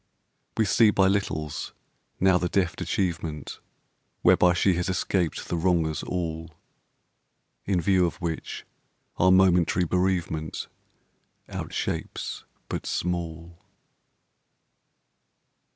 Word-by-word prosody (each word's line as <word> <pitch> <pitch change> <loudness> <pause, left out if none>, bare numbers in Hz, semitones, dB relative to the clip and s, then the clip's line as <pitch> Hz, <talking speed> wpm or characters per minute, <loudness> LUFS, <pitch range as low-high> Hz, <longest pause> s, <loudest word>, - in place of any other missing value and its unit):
We 110 - +3
see 110 +2 +5
by 100 -2 +3
littles 80 -7 -2 0.4
now 95 -1 +4
the 90 - -1
deft 90 -3 0
achievement 85 -5 -2 0.6
Whereby 90 -1 +5
she 90 +2 +3
has 90 +2 -1
escaped 90 -2 -1
the - - -2
Wrongers 85 -3 +1
all, 80 -2 -4 1.1
In 95 -2 +1
view 90 +1 +3
of - - -5
which 85 -2 -4 0.5
our 95 +1 +5
momentary 90 -1 +4
bereavement 90 -3 -1 0.8
Outshapes - - -4 0.2
but - - -4
small. 85 -1 -3
90 Hz, 95 wpm, -26 LUFS, 80-95 Hz, 1.1 s, see